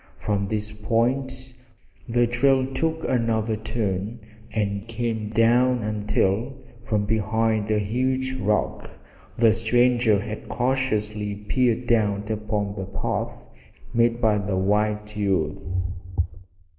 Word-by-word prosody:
From 100 -2 -1
this 105 0 -2
point 130 +4 -1 0.6
the 120 +1 +3
trail 130 +2 +3
took 160 +3 -1
another 115 -3 +1
turn 105 0 -3 0.3
and 100 -1 -1
came 115 -2 -2
down 120 +2 +3
until, 105 +3 0 0.3
from 105 -2 +1
behind 110 0 +1
a 110 - +3
huge 130 +5 0
rock, 105 -4 -1 0.5
the 115 -2 +5
stranger 120 -1 +3
had 105 +1 -6
cautiously 105 -5 -1
peered 120 +4 0
out 105 -2 +1
upon 105 -1 -2
the 95 -2 -5
path 100 - -3 0.5
made 115 0 +3
by 110 -3 +3
the 100 -1 -1
white 105 +2 0
youth. 95 -2 -1
110 Hz, 110 wpm, -24 LUFS, 105-120 Hz, 0.6 s, the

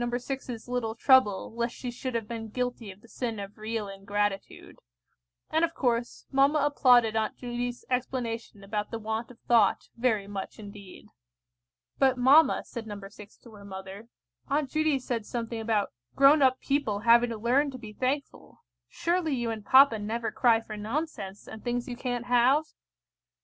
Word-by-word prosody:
6's 245 0 -4
little 240 -3 -2
trouble 235 -6 +3
lest 235 +1 -2
she 250 - -5
should 255 +1 -5
have 225 -2 -2
been 225 -1 -5
guilty 245 -1 -3
of 190 +2 -16
the 235 - -18
sin 230 -2 -4
of 200 +2 -8
real 215 -1 -3
ingratitude; 200 0 -4 0.7
and, 320 +1 +2
of 335 0 0
course, 240 -2 -1
mamma 275 +2 +4
applauded 250 -6 +4
Aunt 220 -1 -1
Judy's 245 0 -4
explanation 240 -4 -3
about 210 +1 -3
the 230 - -4
want 220 +1 -4
of 250 - -14
thought, 230 -4 +2
very 230 -4 +1
much 200 -1 -6
indeed. 200 -3 -11 0.9
"But, 265 -2 +3
mamma," 275 +6 +5
said 230 -2 -7
No. 205 -1 -6
6 205 0 -14
to 235 - -16
her 205 -2 -13
mother, 190 +2 -9 0.4
"Aunt 280 -1 -1
Judy 310 -2 +2
said 245 -3 -3
something 230 +1 -4
about 220 -2 0 0.2
grown 280 +2 +6
up 260 -1 +4
people 275 -8 -1
having 235 +1 +5
to 230 - -4
learn 255 +6 +2
to 260 - -8
be 220 -3 -10
thankful. 265 +5 -4 0.3
Surely 335 - 0
you 240 -2 -2
and 220 -2 -6
papa 260 0 +6
never 225 +2 -3
cry 230 -3 +3
for 215 -1 -8
nonsense, 210 -3 -5
and 220 - -10
things 240 0 -2
you 245 - -5
can't 245 -1 -3
have?" 250 +5 +4
235 Hz, 170 wpm, -28 LUFS, 215-255 Hz, 0.9 s, grown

